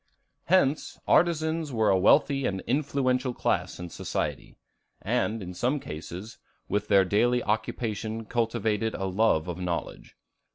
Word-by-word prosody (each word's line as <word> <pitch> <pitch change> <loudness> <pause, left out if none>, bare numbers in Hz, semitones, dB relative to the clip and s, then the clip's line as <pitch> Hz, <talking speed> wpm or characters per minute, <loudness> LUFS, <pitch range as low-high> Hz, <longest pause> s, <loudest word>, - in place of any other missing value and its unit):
Hence 155 -5 +2
artisans 160 -2 +2
were 110 -3 +2
a 95 - +3
wealthy 140 +6 +4
and 95 -1 -3
influential 130 -2 0
class - - -1
in 90 0 -6
society, - - -4 0.4
and, 115 -1 -1
in 90 0 -7
some 125 +10 0
cases, 90 - -8 0.3
with 105 +1 -1
their 100 -2 +5
daily 120 +6 +2
occupation 110 0 -2
cultivated 115 -1 -1
a 95 - -3
love 95 -4 +2
of 90 0 -5
knowledge. 90 -2 -5
110 Hz, 130 wpm, -27 LUFS, 100-130 Hz, 0.4 s, their